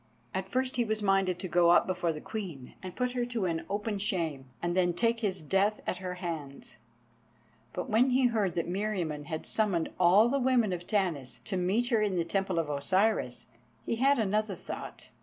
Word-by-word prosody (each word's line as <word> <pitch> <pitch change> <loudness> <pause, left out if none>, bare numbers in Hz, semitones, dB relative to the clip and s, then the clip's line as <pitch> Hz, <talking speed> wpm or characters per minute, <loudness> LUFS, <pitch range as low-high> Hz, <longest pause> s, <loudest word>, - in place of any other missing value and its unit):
At 190 0 -3
first 255 +3 -1
he 240 - +3
was 215 -1 -2
minded 195 -2 +2
to 185 - -5
go 175 0 +4
up 175 - +6
before 180 -2 0
the 155 - -6
Queen 175 - -6
and 185 -1 -7
put 250 0 0
her 245 -1 -1
to 235 -5 -2
an 165 -2 -2
open 205 +1 -2
shame, 165 -9 -1
and 175 0 -1
then 175 -2 +3
take 230 +5 +1
his 190 -6 -2
death 195 +6 +2
at - - -2
her 180 -1 -5
hands; 160 -6 -6 0.9
but 180 - -4
when 235 +5 +3
he 255 +1 +3
heard 215 -7 +1
that 170 - -1
Meriamun 175 -6 -2
had 160 -1 -4
summoned 195 -7 0
all 185 +5 +6
the 275 +3 +1
women 245 -6 +2
of 175 0 -6
Tanis 175 - -1
to 200 - -3
meet 195 +7 +1
her 230 -4 +3
in 205 -3 +1
the 170 -2 0
Temple 190 0 -1
of 165 -2 +1
Osiris, 145 - +1 0.4
he 230 - -1
had 275 +4 +4
another 210 -2 0
thought. - - -8
190 Hz, 200 wpm, -30 LUFS, 170-220 Hz, 0.9 s, up